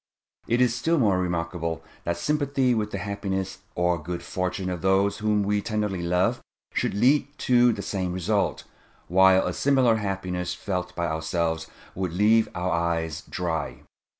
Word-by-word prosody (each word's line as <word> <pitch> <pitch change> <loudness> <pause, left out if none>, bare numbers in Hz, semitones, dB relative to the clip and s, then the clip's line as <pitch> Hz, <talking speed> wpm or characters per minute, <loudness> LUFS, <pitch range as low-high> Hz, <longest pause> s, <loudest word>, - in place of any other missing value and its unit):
It 120 +2 +2
is 125 -2 +4
still 160 +7 +1
more 100 -9 +3
remarkable 85 -2 -2 0.2
that 85 0 -1
sympathy 140 - +1
with 105 -2 -1
the 100 - -4
happiness 95 -1 -3 0.2
or 90 -2 +1
good 85 +3 -5
fortune 90 0 -3
of 90 -2 -4
those 95 +2 +2
whom 105 -1 +1
we 105 +1 +1
tenderly 105 -4 -2
love 90 +1 +1 0.3
should - - 0
lead 130 +6 +4 0.2
to 125 -1 +5
the - - -4
same 95 -3 -2
result, 95 +3 0 0.5
whilst 95 +1 +5
a - - -2
similar 130 -5 +3
happiness 95 -3 -3
felt 90 -2 -4
by 85 - -1
ourselves 80 0 -1 0.3
would 90 -2 -3
leave 110 +4 +4
our 90 +1 -1
eyes 80 -2 -1
dry. 85 -3 -3
95 Hz, 155 wpm, -25 LUFS, 85-105 Hz, 0.5 s, to